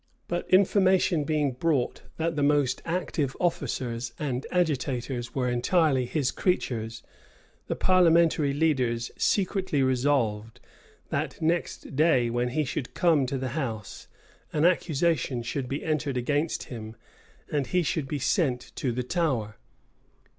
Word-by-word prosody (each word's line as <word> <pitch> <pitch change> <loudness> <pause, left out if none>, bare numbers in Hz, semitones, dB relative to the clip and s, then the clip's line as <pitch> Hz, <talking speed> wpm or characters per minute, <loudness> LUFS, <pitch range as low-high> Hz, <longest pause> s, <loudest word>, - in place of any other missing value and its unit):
But 175 0 -3
information 185 -4 +4
being 150 -3 +1
brought 135 0 0 0.2
that 165 0 -1
the 145 - -1
most 145 -2 +2
active 165 -5 -2
officers 125 -8 -2
and 135 -3 -3
agitators 130 -7 -1
were 130 -2 0
entirely 130 +1 +2
his 140 -2 0
creatures, 115 - -1 0.6
the - - -1
parliamentary 170 -5 +4
leaders 130 -6 0
secretly 190 -7 +1
resolved, 125 -5 0 0.5
that, - - -2
next 165 -3 -2
day, 135 -6 +3
when 120 +1 0
he 150 +5 0
should 125 0 -4
come 160 -7 +3
to 135 +1 -2
the 130 0 -3
house, 120 -7 -5 0.4
an 150 +1 +1
accusation 160 -7 +1
should 125 +2 -3
be 140 +2 -3
entered 150 -4 -1
against 145 +6 0
him, 110 -3 -8 0.6
and 145 -3 0
he 180 +5 +1
should 155 -3 -1
be 145 - -2
sent 130 -2 0
to 130 - -1
the 125 +2 -2
Tower. 125 - -1
140 Hz, 130 wpm, -27 LUFS, 125-165 Hz, 0.6 s, information